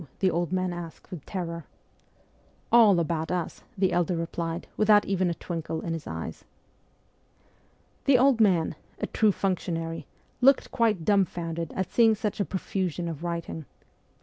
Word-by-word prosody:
the 190 -2 +2
old 170 0 -1
man 185 -1 0
asked 170 -2 -9
with 170 -6 -7
terror. 170 -3 -4 1.1
'All 220 -6 +7
about 165 0 -1
us,' 180 -2 -3 0.2
our 190 -1 +3
elder 175 0 +1
replied, 165 0 -3
without 210 -1 +5
even 185 -2 +1
a 170 - -2
twinkle 165 -2 -4
in 165 - -3
his 165 - -6
eyes. 80 0 -6 1.6
The 275 -2 +6
old 255 -2 +4
man 180 -8 +3 0.3
a - - -1
true 215 -2 +2
functionary 165 -4 -2 0.3
looked 270 +2 +4
quite 215 -8 +1
dumbfounded 170 -5 0
at 190 - -2
seeing 225 -2 +5
such 210 -1 -3
a 200 - +1
profusion 180 -2 -2
of 165 -1 -5
writing. 170 -2 -4
175 Hz, 150 wpm, -27 LUFS, 165-200 Hz, 1.6 s, All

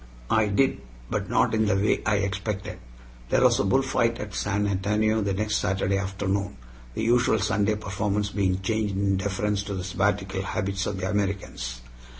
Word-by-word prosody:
I 110 -1 +4
did, 130 - +2 0.3
but - - -2
not - - +2
in 110 -1 +2
the 100 - +3
way 100 +2 +2
I 110 - +3
expected. 100 0 -3 0.5
There - - +3
was - - +5
a - - +3
bullfight 115 +1 +2
at 105 -1 -6
San 105 0 0
Antonio 105 +3 +1
the 100 -2 0
next 105 +2 0
Saturday 95 +1 0
afternoon, 100 +1 -2 0.4
the - - -2
usual 120 -1 +3
Sunday 105 0 +1
performance 100 0 -2
being 95 -2 0
changed 105 -1 0
in 100 0 +1
deference 100 +1 -1
to 100 - -4
the 90 - -3
Sabbatical 95 0 0
habits 95 -1 -2
of 100 - -3
the 95 - -2
Americans. 95 -12 -2
100 Hz, 170 wpm, -26 LUFS, 95-105 Hz, 0.5 s, was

